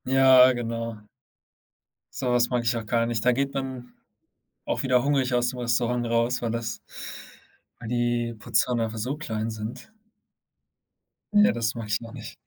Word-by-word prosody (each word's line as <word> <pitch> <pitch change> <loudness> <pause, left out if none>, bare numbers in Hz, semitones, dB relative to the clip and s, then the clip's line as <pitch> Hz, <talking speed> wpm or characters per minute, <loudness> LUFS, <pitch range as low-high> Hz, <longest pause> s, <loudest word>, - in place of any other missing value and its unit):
Ja, 130 -1 +7
genau. 115 -2 -4 1.1
Sowas 125 -2 +1
mag 125 -1 0
ich 120 +2 +2
auch 115 -1 -4
gar 115 +2 +1
nicht. 115 -2 -2
Da 125 - +6
geht 135 +2 -1
man 130 -2 -5 0.7
auch - - -1
wieder 125 -2 +3
hungrig 135 -3 +1
aus 120 0 +2
dem 125 0 -6
Restaurant 120 0 0
raus, 115 +2 +1
weil 120 - -1
das 115 -1 -3 1.0
weil 115 - -7
die 120 -1 0
Portionen 120 +2 +1
einfach 110 0 -5
so 130 +7 -2
klein 110 -7 -3
sind. 110 - -7 1.4
Ja, 210 0 +6
das 115 -1 -1
mache 115 -2 -5
ich 105 +1 0
noch 115 -1 -9
nicht. - - -9
120 Hz, 160 wpm, -26 LUFS, 115-125 Hz, 1.4 s, Ja